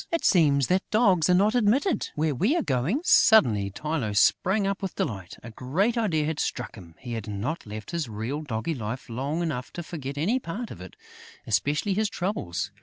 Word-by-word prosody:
"It 335 - -1
seems 145 -7 +4
that 185 +5 +2
dogs 195 -7 +3
are 180 - +5
not 205 +4 +3
admitted 250 - +2
where 155 0 +1
we 205 - +1
are 340 - +1
going." 140 - 0
Suddenly, 115 - +5
Tylô 115 -2 -3
sprang 195 - +3
up 195 0 -2
with 195 -2 -4
delight: 95 -5 -4
a 115 - -8
great 165 - 0
idea 180 -10 +1
had 155 0 -2
struck 125 - -3
him. 85 -6 -13
He 120 -2 -7
had 110 -2 -5
not 110 - -4
left 105 +5 -7
his 165 -7 -2
real, 115 +8 -4
doggy 140 +2 -3
life 125 0 -5
long 140 +8 -2
enough 125 -7 -3
to 175 - -5
forget 145 -4 -6
any 205 - +1
part 225 +3 -6
of 85 - -9
it, 90 - -11 0.5
especially 145 - 0
his 215 +2 0
troubles. 100 - -3
150 Hz, 195 wpm, -26 LUFS, 115-195 Hz, 0.5 s, are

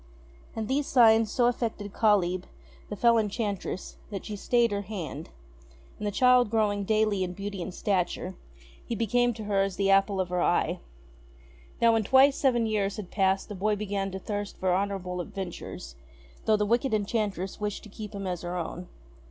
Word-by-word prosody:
And 220 -1 -3
these 275 +3 0
signs 225 -3 +5
so 245 - +2
affected 225 -4 -1
Kalyb, 185 -4 +2 0.4
the 210 - -4
fell 235 +2 +4
enchantress, 205 -3 -3
that 200 -3 -6
she 215 - -5
stayed 235 +2 +2
her 200 0 -1
hand; 195 -5 -6 0.7
and 210 - -2
the - - 0
child 250 +1 +4
growing 205 -2 +1
daily 215 -2 +2
in 180 -1 -4
beauty 200 0 -5
and 185 - -4
stature, 185 -1 -1 0.5
he 235 - -4
became 245 +3 +2
to 220 - -7
her 205 -2 +1
as 195 -1 -1
the 195 0 +2
apple 195 0 +3
of 185 -1 -1
her 180 0 0
eye. - - +1 1.0
Now, 230 -1 +5
when 225 -1 +2
twice 265 +5 +5
seven 240 -4 +2
years 205 -2 0
had 200 -4 -7
passed 195 -1 +1
the 210 - -7
boy 210 +2 0
began 200 -1 -2
to 190 - -5
thirst 205 +1 -5
for 185 -1 +1
honourable 185 -2 -2
adventures, 175 - -7 0.5
though 215 -1 +4
the 210 - +1
wicked 235 +2 +1
enchant 210 -1 -1
ress 190 +4 -5
wished 210 -1 -3
to 215 - -11
keep 210 +1 -8
him 200 -1 -5
as 180 -2 -3
her 175 +1 -4
own. 175 +1 -5
205 Hz, 185 wpm, -28 LUFS, 190-220 Hz, 1.0 s, signs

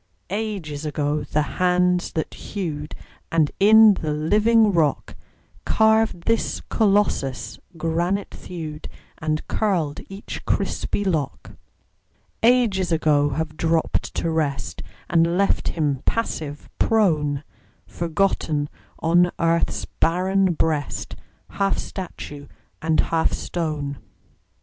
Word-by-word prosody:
Ages 195 -9 -3
ago 150 0 -1
the 150 - 0 0.2
hands 180 0 +2
that 160 - -3
hewed, 155 -7 -5 0.4
And 160 -3 +2
in 220 +1 +8
the 155 -5 -3
living 210 +8 +3
rock 160 -4 +1 0.5
Carved 220 -4 +3
this 230 +3 0
Colossus, 200 - +1 0.2
granite 170 +5 -1
thewed 155 -3 -7 0.3
And 155 -1 -2
curled 175 -9 0
each 195 +1 -7
crispy 205 - -1
lock: 155 -8 -2 0.9
Ages 225 -7 +3
ago 150 -3 +3
have 155 +2 -3
dropped 165 0 0
to 165 - -1
rest 140 - -2 0.3
And 170 +1 +2
left 200 0 +2
him 145 -5 -1
passive, 155 -10 -2
prone, 150 -10 +2 0.4
Forgotten 165 -4 -1 0.3
on 175 +2 +3
earth's 165 0 +1
barren 185 +2 +1
breast, 155 -3 -1 0.3
Half 195 0 0
statue 145 -6 -7 0.3
and 160 0 +1
half 165 -1 +1
stone. 150 -5 -3
165 Hz, 100 wpm, -23 LUFS, 150-195 Hz, 0.9 s, in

